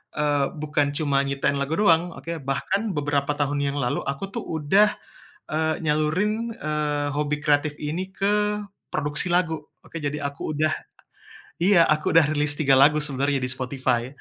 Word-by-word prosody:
eee, 145 -2 +1
bukan 150 -1 -1
cuma 145 -3 +1
nyiptain 140 0 0
lagu 140 +3 -1
doang, 175 -3 +3
oke, 165 - -7 0.2
bahkan 195 +8 -1
beberapa 145 0 0
tahun 145 0 -1
yang 140 0 -1
lalu 125 -3 0
aku 140 +8 -4
tuh - - -4
udah, 190 +7 +3 0.5
eee, 160 +1 0
nyalurin, 180 +10 0
eee, 150 -1 -1
hobi 150 0 -1
kreatif 150 0 +2
ini 165 +6 -3
ke 205 +2 +1 0.5
produksi 145 +4 0
lagu. 170 -2 +2 0.3
Oke 165 -2 -7
jadi 145 +1 -2
aku 140 +2 -4
udah, 155 +1 +1 0.9
iya, 180 0 +5
aku 155 +1 +1
udah 160 -3 +5
rilis 150 -1 +1
3 140 -3 +3
lagu 150 +2 +5
sebenarnya 140 -1 0
di 125 - -1
Spotify. 125 -2 -1
150 Hz, 155 wpm, -24 LUFS, 140-165 Hz, 0.9 s, iya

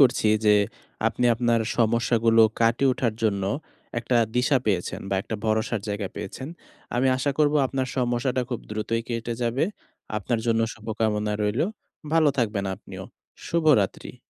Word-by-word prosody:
করছি 125 -5 +4 0.2
যে, 105 -1 +6 0.5
আপনি 125 - 0
আপনার 120 0 +2 0.2
সমস্যাগুলো 115 0 +3 0.2
কাটিয়ে 115 +4 +3
ওঠার 120 -3 -1
জন্য 100 -3 +1 0.6
একটা 120 +1 0 0.2
দিশা 125 +3 +3
পেয়েছেন 95 -5 -1
বা - - +1
একটা 110 - -5
ভরসার 110 0 0
জায়গা 100 -1 -2
পেয়েছেন। 130 +7 -6 0.5
আমি 125 +2 +2
আশা 130 +2 0
করব 150 -1 +3
আপনার 130 0 -2
সমস্যাটা 125 +1 0
খুব 120 - -2
দ্রুতই 110 +2 -1
কেটে 115 0 -3
যাবে। 120 +5 +1 0.5
আপনার 110 +3 -1
জন্য 115 -1 +2
শুভকামনা 110 -1 -1
রইলো। 105 +10 +1 0.5
ভালো 160 -2 +5
থাকবেন 105 -4 0
আপনিও। - - -10 0.4
শুভরাত্রি। 155 - +2
115 Hz, 140 wpm, -25 LUFS, 110-125 Hz, 0.6 s, যে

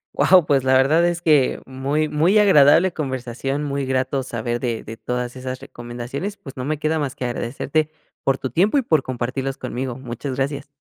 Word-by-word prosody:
Guau, 185 -4 +5
pues, 140 -3 +2
la 130 - +4
verdad 150 +6 +4
es 175 0 -2
que, 150 -6 +3
muy 140 +4 -1
muy 165 +8 +3
agradable 180 -2 +6
conversación. 135 -1 -3
Muy 140 -1 -2
grato 130 +1 0
saber 120 -1 -3
de 120 -3 -2
de 110 +1 -8
todas 125 +1 -4
esas 130 0 -5
recomendaciones, 120 - -6
pues, 135 -9 -12
no 125 - -4
me 150 +1 -2
queda 155 +1 0
más 140 -3 -3
que - - -6
agradecerte 140 +5 -1 0.3
por 135 0 +2
tu 130 - -4
tiempo 195 - +2
y - - +4
por 160 - +2
compartirlos 130 +2 -3
conmigo. 125 -1 -4
Muchas 130 +1 -5
gracias. 140 +1 -2
135 Hz, 190 wpm, -21 LUFS, 125-155 Hz, 0.3 s, agradable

